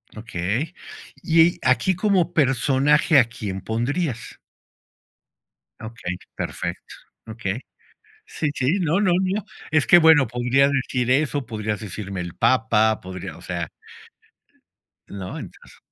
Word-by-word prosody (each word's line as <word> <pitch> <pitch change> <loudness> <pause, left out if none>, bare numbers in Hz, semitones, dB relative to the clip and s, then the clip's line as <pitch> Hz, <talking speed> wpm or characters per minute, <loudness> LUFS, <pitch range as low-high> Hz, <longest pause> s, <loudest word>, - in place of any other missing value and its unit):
Okey. 110 - -3 0.5
Y 165 +1 +4
aquí, 130 +9 +2
como 185 -3 +1
personaje, 140 +2 +3
¿a 120 - +5
quién 100 -5 -6
pondrías? 120 +2 -3 1.4
Okey, 110 -6 -6 0.2
perfecto. - - -5 0.3
Okey. 110 -1 -4 0.7
Sí, 150 - -3
sí, 145 +10 +1
no, 175 +3 +1
no, 185 -4 +3
no, 190 +2 -1 0.3
es 155 -2 +2
que, 175 - +8
bueno, 160 -6 +6
podrías 125 +4 +2
decir 125 -2 -1
eso, 140 0 +1
podrías 110 -2 -3
decirme 100 -3 -6
el 85 -1 -7
Papa, 110 -3 +2
podrías 95 -1 -7
o - - -14
sea - - -4 1.4
¿No? 95 -2 -7
Entonces - - -12
130 Hz, 115 wpm, -23 LUFS, 110-155 Hz, 1.4 s, que